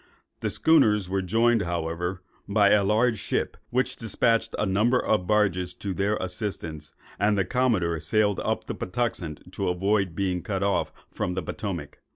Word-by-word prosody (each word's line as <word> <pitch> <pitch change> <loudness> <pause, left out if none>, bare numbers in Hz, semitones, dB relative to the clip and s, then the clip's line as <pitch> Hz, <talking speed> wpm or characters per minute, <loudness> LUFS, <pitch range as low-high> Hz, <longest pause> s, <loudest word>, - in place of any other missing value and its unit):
The - - -1
schooners 110 - +3
were 95 0 +1
joined, 115 +4 +2
however, 85 +1 -3 0.3
by 100 -1 +4
a 105 -1 +5
large 110 +2 +2
ship, - - -2
which 130 +1 0
despatched 115 +1 0
a - - +1
number 105 +6 +2
of 100 -7 0
barges 90 -4 +1
to 100 -2 -4
their 100 +4 0
assistance; 90 -6 -5 0.2
and 105 +1 +2
the 100 - +2
commodore 100 -9 +1
sailed 105 +2 +1
up - - -2
the - - -4
Patuxent 90 -5 -3
to 95 -2 -1
avoid 95 0 +1
being 90 -2 -1
cut 100 +1 -2
off 100 0 +1 0.2
from 90 - -2
the 95 - -2
Potomac. 85 -5 -5
100 Hz, 165 wpm, -26 LUFS, 90-110 Hz, 0.3 s, a